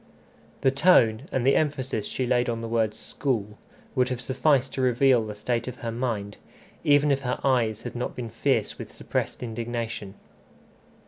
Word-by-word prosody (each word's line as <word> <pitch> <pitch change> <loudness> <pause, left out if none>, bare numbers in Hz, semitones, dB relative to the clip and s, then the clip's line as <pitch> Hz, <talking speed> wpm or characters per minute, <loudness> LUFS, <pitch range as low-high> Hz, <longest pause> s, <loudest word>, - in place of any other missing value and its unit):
The 135 - +4
tone, 135 -6 +4
and 130 -2 0
the 135 - +5
emphasis 135 -8 0
she 130 - -2
laid 125 0 +2
on 115 -1 -2
the 115 - -4
word 110 -2 0
school, 110 -3 -3 0.3
would 130 -2 +2
have 125 -2 -2
sufficed 130 +1 +1
to 130 - -2
reveal 125 -1 +4
the 105 -1 -6
state 115 +3 -2
of 125 - -5
her 115 - -1
mind, 115 -4 -3 0.5
even 145 0 +4
if 140 - +2
her 125 -2 -2
eyes 120 -6 +1
had - - -6
not 120 - -3
been 120 -3 -5
fierce - - 0
with - - -7
suppressed - - -3
indignation. 115 -3 -4
120 Hz, 175 wpm, -26 LUFS, 115-130 Hz, 0.5 s, the